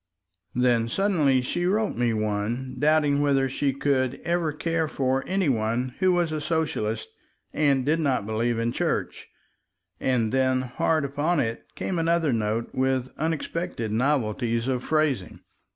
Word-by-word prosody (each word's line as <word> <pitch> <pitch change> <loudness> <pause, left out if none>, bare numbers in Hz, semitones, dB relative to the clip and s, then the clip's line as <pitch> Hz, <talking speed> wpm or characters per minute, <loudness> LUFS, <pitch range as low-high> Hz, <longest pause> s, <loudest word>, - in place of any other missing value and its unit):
Then 120 -2 +2
suddenly 150 - +2
she 175 +7 -1
wrote 215 +3 +1
me 120 0 +1
one 110 +4 -2
doubting 150 -1 +3
whether 135 -2 +2
she 135 +1 0
could 135 -1 0
ever 170 -2 0
care 165 +2 -1
for 135 -2 0
any 190 -2 +1
one 120 +1 0
who 185 -1 +4
was 175 -2 +1
a 155 -1 -2
Socialist 145 -9 -1 0.4
and 140 -4 +2
did 155 +3 +2
not 135 -9 0
believe 115 +2 0
in 115 +1 0
Church, - - -2 0.7
and 120 -4 +1
then 130 -1 +2
hard 140 +4 0
upon 145 +5 0
it 115 -2 -2
came 180 -3 -2
another 165 -3 +2
note 110 +1 -1
with 130 -1 0
unexpected 160 -5 -2
novelties 115 -1 0
of 125 -2 -1
phrasing. 155 -10 0
135 Hz, 145 wpm, -25 LUFS, 120-155 Hz, 0.7 s, who